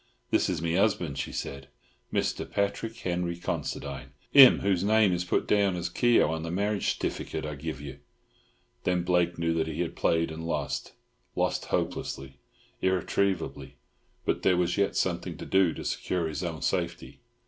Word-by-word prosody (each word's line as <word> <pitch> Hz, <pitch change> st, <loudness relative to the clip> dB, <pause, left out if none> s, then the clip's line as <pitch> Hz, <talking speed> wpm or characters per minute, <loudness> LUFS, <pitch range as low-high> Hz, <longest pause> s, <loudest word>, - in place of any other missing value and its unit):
"This -, -, +3 dB
is 80 Hz, -, -2 dB
my 85 Hz, -, 0 dB
'usband," 85 Hz, -6 st, +1 dB
she -, -, -3 dB
said, 70 Hz, -1 st, -5 dB, 0.4 s
"Mr. -, -, -1 dB
Patrick 100 Hz, +3 st, -1 dB
Henery 85 Hz, -1 st, -2 dB
Considine. 70 Hz, -6 st, -4 dB, 0.2 s
Him 135 Hz, -2 st, +9 dB
whose 95 Hz, -2 st, +1 dB
name 105 Hz, -2 st, +4 dB
is 90 Hz, 0 st, 0 dB
put 90 Hz, -, 0 dB
down 100 Hz, -3 st, +3 dB
as 85 Hz, 0 st, -3 dB
Keogh 120 Hz, +4 st, +4 dB
on 80 Hz, 0 st, -2 dB
the 80 Hz, -, -4 dB
marriage 100 Hz, +3 st, 0 dB
stiffykit -, -, -3 dB
I 75 Hz, -, -4 dB
give 75 Hz, -1 st, -5 dB
you." 70 Hz, -2 st, -8 dB, 0.8 s
Then 90 Hz, -1 st, +1 dB
Blake 90 Hz, -1 st, +1 dB
knew 85 Hz, 0 st, 0 dB
that 80 Hz, -1 st, 0 dB
he 80 Hz, -, -3 dB
had 85 Hz, -, -3 dB
played 80 Hz, 0 st, +1 dB
and 80 Hz, +1 st, -6 dB
lost—lost 75 Hz, -4 st, -3 dB
hopelessly, 70 Hz, 0 st, -3 dB, 0.4 s
irretrievably. 95 Hz, +1 st, 0 dB, 0.5 s
But -, -, 0 dB
there 90 Hz, -2 st, +3 dB
was 90 Hz, -1 st, +1 dB
yet 100 Hz, -1 st, +1 dB
something -, -, -1 dB
to -, -, -7 dB
do 95 Hz, -3 st, +3 dB
to -, -, -7 dB
secure 90 Hz, -3 st, -1 dB
his 80 Hz, +3 st, -4 dB
own 80 Hz, -3 st, -4 dB
safety. -, -, -2 dB
85 Hz, 165 wpm, -28 LUFS, 80-95 Hz, 0.8 s, Him